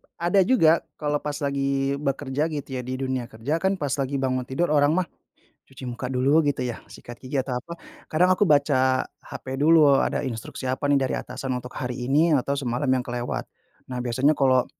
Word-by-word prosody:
ada 175 +4 +2
juga 220 -12 +5 0.3
kalau 150 -1 0
pas 145 0 -4
lagi 140 0 0
bekerja 140 -1 -2
gitu 145 - -5
ya, 125 - -2
di - - -2
dunia 130 -2 -2
kerja 115 +6 -4
kan 190 +2 +1
pas 145 - -1
lagi 135 +1 -1
bangun 130 -2 -1
tidur, 150 +4 0
orang 145 -1 +4
mah 185 -3 0 0.6
cuci 135 0 -14
muka 125 +1 -5
dulu 130 +2 +2 0.2
gitu 135 -3 0
ya, - - -6
sikat 120 0 -11
gigi, 130 +2 -4
atau 125 -2 -3
apa, 170 +7 -10 0.4
kadang 180 +4 +3
aku 205 - +2
baca 130 -3 +3 0.2
HP - - -10
dulu, 150 -2 +6
ada - - 0
instruksi 120 0 -6
apa 130 +2 -2
nih 140 - +5
dari 130 - -1
atasan 130 +1 -6
untuk 125 0 -10
hari 125 -1 -3
ini 155 +5 +3
atau 140 +3 -1
semalam 130 0 -2
yang 130 -1 +2
kelewat. 120 0 -3 0.5
Nah 125 - -3
biasanya 130 +5 +2
kalo 130 -2 +3
135 Hz, 195 wpm, -24 LUFS, 130-145 Hz, 0.6 s, dulu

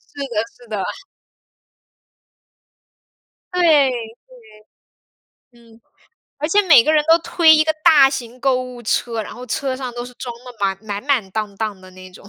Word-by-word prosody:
是 285 - -6
的， 225 - -6 0.2
是 240 - -16
的。 205 -3 -3 2.7
对， 360 - 0
对。 295 -6 +4 1.6
嗯， 230 -1 -21 0.6
而 300 +2 -2
且 415 +4 +3
每 285 -7 +8
个 310 - +2
人 305 - +3
都 330 +1 +6
推 330 -1 +4
一 310 - +3
个 315 - +1
大 285 -4 +7
型 245 -2 -6
购 255 -1 +1
物 250 -1 -10
车， 230 0 -1
然 - - -10
后 250 +1 -10
车 260 +2 -2
上 255 -2 -6
都 240 0 -5
是 250 - -11
装 245 0 -7
得 250 -1 -11
满 195 -1 0
满 205 -1 -5
满 250 -9 0
当 210 -1 -4
当 210 -3 -4
的 185 - -15
那 185 0 -13
种。 200 - -15
245 Hz, 180 characters per minute, -19 LUFS, 220-285 Hz, 2.7 s, 每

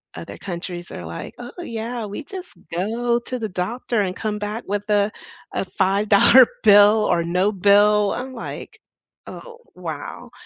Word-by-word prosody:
other - - -8
countries 175 -1 -6
are 85 - -7
like, 85 +1 -7
"Oh, 245 0 -8
yeah, 230 -4 -5
we 205 +9 -6
just 370 +2 -9 0.2
go 235 +6 0
to 250 +1 -5
the 220 -2 -3
doctor 210 +5 -2
and 185 -2 -2
come 210 -1 -3
back 210 +3 -4
with 205 +1 -2
a 205 0 +2 0.4
a - - -1
five-dollar 200 +6 +5 0.2
bill, 210 +1 +6
or 170 - +2
no 180 +5 +1
bill," 205 +1 +4
I'm 260 +1 -5
like, 230 - -8 0.5
"Oh 475 -2 -10 0.2
wow," - - -7
210 Hz, 155 wpm, -22 LUFS, 195-235 Hz, 0.5 s, bill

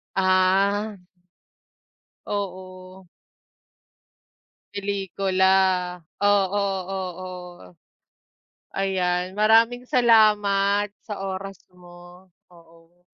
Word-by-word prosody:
Ah. 195 +2 +2 1.3
Oo. 185 -2 -7 1.7
Pelikula, 195 -1 -1 0.8
oo-oo. 185 - -2 1.0
Ayan, 185 -1 -1
maraming 230 +3 +3
salamat 205 -4 +3 0.2
sa 205 -3 -6
oras 195 0 -5 0.2
mo, 175 0 -16 0.2
oo. 170 0 -22
190 Hz, 50 wpm, -23 LUFS, 180-200 Hz, 1.7 s, maraming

